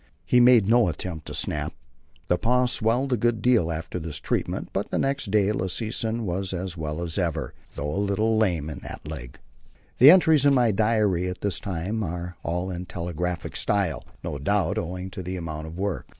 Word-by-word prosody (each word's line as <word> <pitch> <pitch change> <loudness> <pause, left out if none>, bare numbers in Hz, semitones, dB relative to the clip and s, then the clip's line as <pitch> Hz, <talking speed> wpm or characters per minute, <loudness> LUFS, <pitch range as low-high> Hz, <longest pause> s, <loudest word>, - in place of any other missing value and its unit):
He 125 +7 +4
made 120 -4 +6
no 115 -1 +5
attempt 80 -2 -5
to - - -5
snap. - - -2 0.5
The 90 - +1
paw 125 +2 +2
swelled 125 +3 +1
a - - +2
good 115 +1 +1
deal 115 -9 +3
after 80 +2 -4
this 80 -3 -4
treatment, - - -2
but - - -2
next 135 -5 0
day 105 0 +3
Lassesen 110 +3 -2
was 95 +1 -2
as 90 0 -4
well 80 0 -4
as 85 +2 -2
ever, 85 -4 -2 0.2
though 75 +1 -3
a 100 - 0
little 105 +3 +1
lame 90 -9 +1
in 75 -3 -6
that - - -9
leg. - - -7 0.6
The 130 - +10
entries 160 -4 +6
in 140 -1 +5
my 120 -3 +4
diary 105 -4 +1
at 90 - -7
this 100 -4 0
time 100 +4 -3
are 90 -1 -4
all 90 +2 -2
in 90 0 -6
telegraphic 85 0 -4
style, 100 -7 +1 0.2
no 70 - -4
doubt 100 +5 +1
owing 90 +2 -5
to 95 - -6
the 90 +1 -5
amount 80 -2 -5
of 80 +2 -9
work. 95 -7 -3
95 Hz, 195 wpm, -25 LUFS, 85-110 Hz, 0.6 s, The